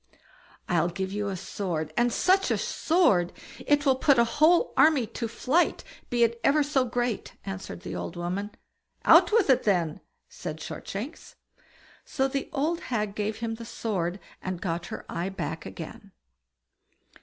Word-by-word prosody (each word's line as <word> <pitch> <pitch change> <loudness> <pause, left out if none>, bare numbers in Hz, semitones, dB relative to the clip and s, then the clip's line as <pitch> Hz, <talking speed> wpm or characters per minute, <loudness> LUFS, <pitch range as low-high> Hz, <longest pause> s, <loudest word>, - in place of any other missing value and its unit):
"I'll 170 -1 +2
give 190 +2 -4
you 205 0 -2
a 195 -2 -3
sword, 165 -5 -3
and 240 0 +3
such 380 +9 +3
a - - +2
sword! 205 - +2 0.4
It 290 0 +3
will 265 -2 +4
put 275 0 +4
a 235 - +6
whole 315 - +3
army 305 -6 +5
to 230 +2 -4
flight, 275 +9 +1 0.3
be 240 -1 +3
it 235 0 +1
ever 295 +2 +4
so 280 -3 +1
great", 240 -2 -2
answered 195 -2 -6
the - - -6
old 170 - -5
woman. 180 +4 -3 0.6
"Out - - +7
with 440 -2 +4
it, 255 - +4
then!" 175 -7 +1 0.3
said 155 -3 -7
Shortshanks. 215 - -7 0.7
So 265 - 0
the 275 +2 -3
old 315 +3 0
hag 210 -4 -1
gave 210 0 -2
him 230 -1 -2
the 230 +1 -7
sword, 195 -6 -3 0.2
and 185 -2 -4
got 170 -1 -3
her - - -7
eye 175 +3 -3
back 175 -4 -5
again. 95 - -9
225 Hz, 160 wpm, -27 LUFS, 185-275 Hz, 0.7 s, Out